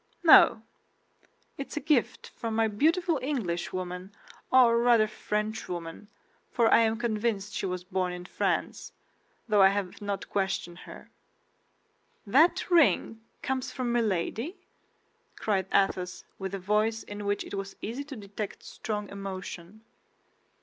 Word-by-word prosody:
"No. 310 Hz, -8 st, +7 dB, 1.0 s
It 275 Hz, -, -4 dB
is -, -, -9 dB
a -, -, +2 dB
gift 290 Hz, -4 st, 0 dB
from 225 Hz, -1 st, -5 dB
my 225 Hz, 0 st, +3 dB
beautiful 320 Hz, -, +1 dB
Englishwoman, 185 Hz, -, -3 dB, 0.4 s
or 240 Hz, -3 st, +6 dB
rather 235 Hz, -2 st, +5 dB
Frenchwoman—for 210 Hz, +1 st, -3 dB
I -, -, +7 dB
am 225 Hz, -1 st, +2 dB
convinced 215 Hz, -3 st, -1 dB
she -, -, -2 dB
was 180 Hz, -1 st, -4 dB
born 185 Hz, -1 st, -1 dB
in 180 Hz, 0 st, -7 dB
France, -, -, -2 dB, 0.5 s
though 210 Hz, -3 st, +4 dB
I 190 Hz, -, +9 dB
have 195 Hz, -1 st, -2 dB
not 200 Hz, -1 st, -3 dB
questioned 190 Hz, -3 st, -2 dB
her." -, -, -12 dB, 1.1 s
"That 290 Hz, -, +4 dB
ring 280 Hz, -9 st, +3 dB, 0.2 s
comes 260 Hz, -1 st, -2 dB
from 250 Hz, -2 st, -2 dB
Milady?" 230 Hz, -, -1 dB, 0.8 s
cried 195 Hz, -3 st, -1 dB
Athos, 185 Hz, -2 st, +1 dB, 0.2 s
with 195 Hz, 0 st, -4 dB
a -, -, -3 dB
voice 210 Hz, +4 st, 0 dB
in 205 Hz, 0 st, -7 dB
which 205 Hz, 0 st, 0 dB
it -, -, -10 dB
was 195 Hz, 0 st, -5 dB
easy 240 Hz, +6 st, -4 dB
to 280 Hz, -1 st, -8 dB
detect 205 Hz, -1 st, -7 dB
strong 210 Hz, -2 st, -5 dB
emotion. 195 Hz, 0 st, -7 dB
210 Hz, 130 wpm, -28 LUFS, 190-235 Hz, 1.1 s, I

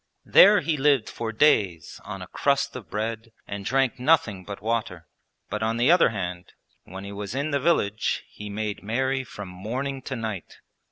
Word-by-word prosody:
There 205 Hz, 0 st, +7 dB
he 160 Hz, -2 st, 0 dB
lived 140 Hz, -4 st, +3 dB
for 115 Hz, -1 st, -4 dB
days 100 Hz, -, +2 dB
on 95 Hz, -1 st, -7 dB
a -, -, -10 dB
crust 140 Hz, -1 st, 0 dB
of 125 Hz, -6 st, -8 dB
bread 115 Hz, +1 st, -4 dB, 0.2 s
and 100 Hz, -1 st, -5 dB
drank 130 Hz, +3 st, +1 dB
nothing 125 Hz, -9 st, +2 dB
but 100 Hz, +1 st, -7 dB
water. 105 Hz, -7 st, -2 dB, 0.4 s
But 105 Hz, +1 st, -4 dB
on 110 Hz, +1 st, 0 dB
the 125 Hz, +6 st, +4 dB
other 175 Hz, -6 st, +6 dB
hand, 90 Hz, -4 st, -5 dB, 0.3 s
when 95 Hz, +2 st, -8 dB
he 100 Hz, -, -7 dB
was 100 Hz, +2 st, -6 dB
in 140 Hz, +3 st, -1 dB
the 140 Hz, -, +1 dB
village 120 Hz, -9 st, +1 dB
he 105 Hz, 0 st, -9 dB
made 105 Hz, 0 st, -3 dB
merry 130 Hz, +5 st, -1 dB
from 105 Hz, -5 st, -9 dB
morning 125 Hz, +9 st, -4 dB
to 130 Hz, -, -5 dB
night. 110 Hz, -6 st, -5 dB
110 Hz, 180 wpm, -25 LUFS, 100-135 Hz, 0.4 s, There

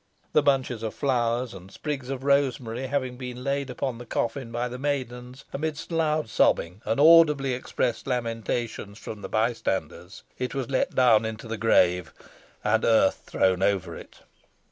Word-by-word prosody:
The 150 Hz, -, +5 dB
bunches 135 Hz, -5 st, +1 dB
of 110 Hz, -1 st, -4 dB
flowers 125 Hz, -3 st, 0 dB
and 95 Hz, 0 st, -12 dB
sprigs 140 Hz, -4 st, -5 dB
of 135 Hz, -1 st, -4 dB
rosemary 130 Hz, -3 st, +1 dB
having 130 Hz, -2 st, -2 dB
been 125 Hz, -1 st, -7 dB
laid 140 Hz, 0 st, -1 dB
upon 125 Hz, -1 st, -3 dB
the 120 Hz, -, -8 dB
coffin 115 Hz, +1 st, -2 dB
by 120 Hz, +1 st, -1 dB
the 125 Hz, +1 st, -7 dB
maidens, 130 Hz, -2 st, -4 dB
amidst 155 Hz, +3 st, -4 dB
loud 155 Hz, -4 st, +1 dB
sobbing 90 Hz, -3 st, +1 dB
and 140 Hz, -, 0 dB
audibly 150 Hz, -4 st, +6 dB
expressed 125 Hz, -1 st, -2 dB
lamentations 115 Hz, -3 st, -3 dB
from 110 Hz, -2 st, -8 dB
the -, -, -6 dB
bystanders, 100 Hz, -5 st, -2 dB, 0.2 s
it 125 Hz, +1 st, -3 dB
was 135 Hz, -2 st, -3 dB
let 130 Hz, -, 0 dB
down 120 Hz, -4 st, +5 dB
into 110 Hz, +1 st, -5 dB
the 115 Hz, -, -3 dB
grave, 90 Hz, -5 st, +2 dB, 0.5 s
and 110 Hz, +1 st, +2 dB
earth 110 Hz, -4 st, +3 dB
thrown 95 Hz, -1 st, +2 dB
over 95 Hz, -2 st, 0 dB
it. -, -, -13 dB
125 Hz, 160 wpm, -26 LUFS, 110-135 Hz, 0.5 s, audibly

